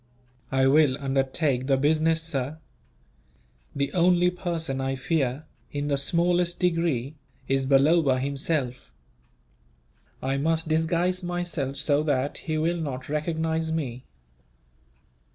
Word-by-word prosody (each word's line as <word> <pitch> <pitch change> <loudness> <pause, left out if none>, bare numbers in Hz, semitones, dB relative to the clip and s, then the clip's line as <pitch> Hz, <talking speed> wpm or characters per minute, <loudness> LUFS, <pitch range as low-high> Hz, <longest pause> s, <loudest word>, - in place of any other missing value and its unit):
"I 130 0 +3
will 140 -1 +4
undertake 135 -1 0
the 135 -1 +3
business, 160 +3 +2
sir. 145 -2 -2 1.2
The 140 0 -1
only 180 0 +3
person 165 -7 -3
I 135 0 -1
fear, 135 0 -1 0.3
in 145 0 -3
the 140 - +1
smallest 175 +3 +1
degree, 165 -7 0 0.3
is 135 0 +1
Balloba 140 0 +4
himself. 135 -1 -2 1.3
I 135 +1 -1
must 160 +3 0
disguise 170 +3 +1
myself 175 -6 -3
so 145 +1 +1
that 145 -2 -1
he 155 -1 -3
will 165 +3 0
not 135 -5 -5
recognize 160 +1 -1
me." 130 -6 -3
150 Hz, 115 wpm, -26 LUFS, 135-165 Hz, 1.3 s, will